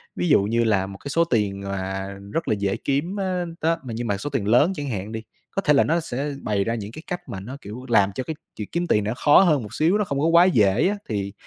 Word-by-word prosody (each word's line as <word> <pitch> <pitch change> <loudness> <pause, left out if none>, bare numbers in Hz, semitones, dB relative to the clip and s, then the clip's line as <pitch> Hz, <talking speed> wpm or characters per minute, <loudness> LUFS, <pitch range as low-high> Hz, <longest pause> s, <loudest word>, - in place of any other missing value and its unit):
Ví 175 - -1
dụ 140 - +5
như 115 +3 +1
là 100 -4 +1
một 95 - -9
cái 140 - -8
số 165 +4 +3
tiền 105 -8 0
mà 95 0 -4 0.3
rất 165 - -1
là - - +2
dễ 100 -1 0
kiếm 145 +8 -1
á, 185 -2 -1 0.2
đó, 165 +1 +2
nhưng 120 -1 -4
mà 100 -2 0
số 145 - -4
tiền 130 -8 -2
lớn 125 - +4
chẳng 145 -3 -4
hạn 105 -2 -4
đi, 110 0 -5 0.3
có 195 - -1
thể 150 - +3
là 140 - +5
nó 165 +2 +2
sẽ 145 -2 -3
bày 100 -2 0
ra 115 +3 -1
những 105 -2 -6
cái 155 - -9
cách 180 -1 -5
mà 95 - -5
nó, 125 +8 -8
kiểu, 110 +6 -8
làm 100 -4 +4
cho 130 - -2
cái 160 - -5 0.2
việc 105 - -6
kiếm 175 +1 -1
tiền 105 - +2
nó 105 +2 -1
khó 145 +6 +6
hơn 155 -9 +3
một 105 0 -9
xíu, 165 - +2
nó - - +2
không 140 -6 -2
có 150 - +1
quá 170 +1 +6
dễ 110 - +3
á. 205 - -1
Thì, 100 -3 -2
120 Hz, 285 wpm, -23 LUFS, 100-160 Hz, 0.3 s, khó